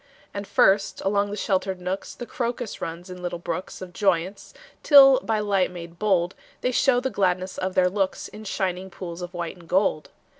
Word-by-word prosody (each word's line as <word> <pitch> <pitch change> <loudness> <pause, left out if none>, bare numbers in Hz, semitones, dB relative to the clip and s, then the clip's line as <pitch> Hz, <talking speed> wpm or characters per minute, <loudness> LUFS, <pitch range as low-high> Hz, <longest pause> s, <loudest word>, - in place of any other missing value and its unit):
And 200 0 -5
first, 195 +1 +3
along 200 +1 +1
the 205 - -5
sheltered 190 -2 -1
nooks, 180 +2 -4
The 240 - -7
crocus 240 -2 -4
runs 170 +3 -6
in 180 0 -9
little 175 -1 -3
brooks 185 +2 -5
Of 180 -1 -10
joyance, 190 -1 0 0.3
till 270 -3 +8
by 225 -4 -1
light 200 -3 +1
made 170 -1 -10
bold 190 -4 +1 0.3
They 250 - +1
show 250 0 +3
the 260 +1 -2
gladness 185 -1 0
of 185 0 -3
their 180 -1 +4
looks 190 0 -1
In 215 - -11
shining 190 -2 -2
pools 175 -1 -8
of 175 +1 -7
white 170 0 -4
and 170 -2 -17
gold. 185 -5 +1
190 Hz, 190 wpm, -24 LUFS, 180-205 Hz, 0.3 s, till